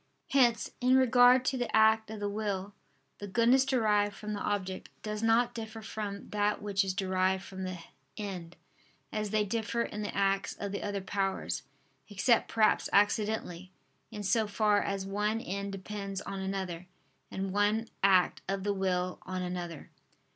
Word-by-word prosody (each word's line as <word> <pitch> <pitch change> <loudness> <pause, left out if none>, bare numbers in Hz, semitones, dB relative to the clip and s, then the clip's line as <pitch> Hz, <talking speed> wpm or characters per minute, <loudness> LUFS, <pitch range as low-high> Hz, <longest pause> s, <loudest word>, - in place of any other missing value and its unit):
Hence, 245 -4 +3
in 255 +1 +4
regard 255 0 +6
to 260 -1 0
the 245 - -1
act 220 0 +4
of 220 -1 -6
the 205 - -1
will, 205 -1 -3 0.5
the 205 - -6
goodness 235 +6 +4
derived 210 -6 +2
from 210 0 -5
the 205 - -3
object, 190 -3 -3
does 210 0 -3
not 235 +2 +3
differ 220 -1 -7
from 205 -2 -5
that 210 0 +1
which 200 -1 0
is 190 -1 -2
derived 190 0 +1
from 190 -1 -6
the 185 -1 -4 0.4
end, 180 -5 -6 0.6
as 215 -1 -2
they 215 0 +1
differ 230 +2 -1
in 210 - -5
the 205 - -4
acts 195 0 +1
of 200 -1 -5
the 200 - -3
other 205 -1 -3
powers; 195 0 -2 0.5
except 205 +4 +2
perhaps 220 -1 +3
accidentally, 205 -3 +1 0.4
in 210 -2 -6
so 215 +3 +2
far 205 0 +2
as 195 -1 -2
one 210 +3 0
end 200 -1 -4
depends 195 0 -5
on 195 - -5
another, 190 -2 -4 0.4
and 190 0 -3
one 210 +3 +2
act 190 -2 +4
of 195 -1 -1
the 205 0 +1
will 185 -2 -1
on 185 0 -4
another. 175 -3 -5
205 Hz, 165 wpm, -31 LUFS, 190-220 Hz, 0.6 s, regard